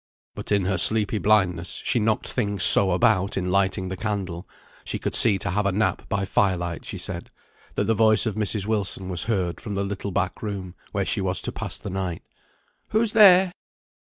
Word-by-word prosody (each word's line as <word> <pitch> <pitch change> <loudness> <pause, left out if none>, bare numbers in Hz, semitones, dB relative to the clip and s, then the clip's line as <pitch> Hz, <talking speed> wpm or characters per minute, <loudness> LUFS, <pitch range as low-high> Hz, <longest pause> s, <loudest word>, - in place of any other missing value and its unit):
But - - -8
in 100 -2 +1
her 95 -1 -1
sleepy 110 -1 +5
blindness 90 -6 0
she 120 - +1
knocked 110 0 -1
things 100 -6 -1
so 95 +2 +8
about 100 0 +1
in 90 -1 -2
lighting 95 -1 0
the 95 - -5
candle 95 -3 -5 0.3
(she - - -4
could - - -4
see 105 -4 +4
to 100 0 -4
have 105 +2 -1
a - - +1
nap 105 +4 -2
by 100 -2 -1
fire 95 -1 +1
light, 85 -1 -6
she - - -7
said), - - -6 0.5
that - - 0
the 115 - +1
voice 110 +1 +4
of 110 - -2
Mrs. 105 -1 -2
Wilson 100 -3 -3
was 90 -2 -1
heard 95 -6 -2
from 105 -2 -6
the 100 - -2
little 100 0 -5
back 95 0 -3
room, 100 -4 -6 0.2
where 100 -1 -2
she - - -1
was 95 -1 -2
to - - -4
pass - - -5
the - - -7
night. 95 -3 -4 0.7
"Who's 220 0 0
there?" 190 -4 +6
100 Hz, 205 wpm, -23 LUFS, 95-110 Hz, 0.7 s, so